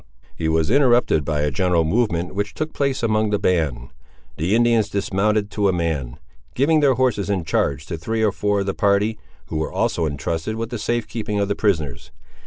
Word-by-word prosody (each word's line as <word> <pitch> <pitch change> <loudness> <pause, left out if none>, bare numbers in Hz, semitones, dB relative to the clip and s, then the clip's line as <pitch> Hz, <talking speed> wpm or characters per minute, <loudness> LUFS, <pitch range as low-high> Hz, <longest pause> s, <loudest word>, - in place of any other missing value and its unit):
He 80 - -2
was 80 +3 +1
interrupted 120 - +3
by 75 0 -1
a 75 0 0
general 85 +3 +2
movement 90 -1 0
which 100 +1 -3
took 155 0 -3
place 140 -3 -1
among 110 -1 +2
the 105 - +1
band. 80 -10 0 0.5
The 85 +8 +1
Indians 115 -3 +3
dismounted 100 +1 0
to 105 -2 +1
a - - +3
man, 80 -8 -2 0.4
giving 155 +4 +3
their 140 -3 +4
horses 120 -6 0
in 95 -4 0
charge 80 0 0
to 85 -2 -5
three 110 +7 -1
or 105 - +3
four 105 +1 0
of - - -2
the 95 - -1
party, 105 +2 +1 0.3
who 80 - -3
were 80 - -2
also 85 -2 0
intrusted 80 +7 -3
with 115 +1 -4
the 120 - -4
safe 120 +1 -1
keeping 105 -1 -3
of 100 0 0
the 100 - 0
prisoners. 80 - -1
100 Hz, 200 wpm, -21 LUFS, 80-110 Hz, 0.5 s, their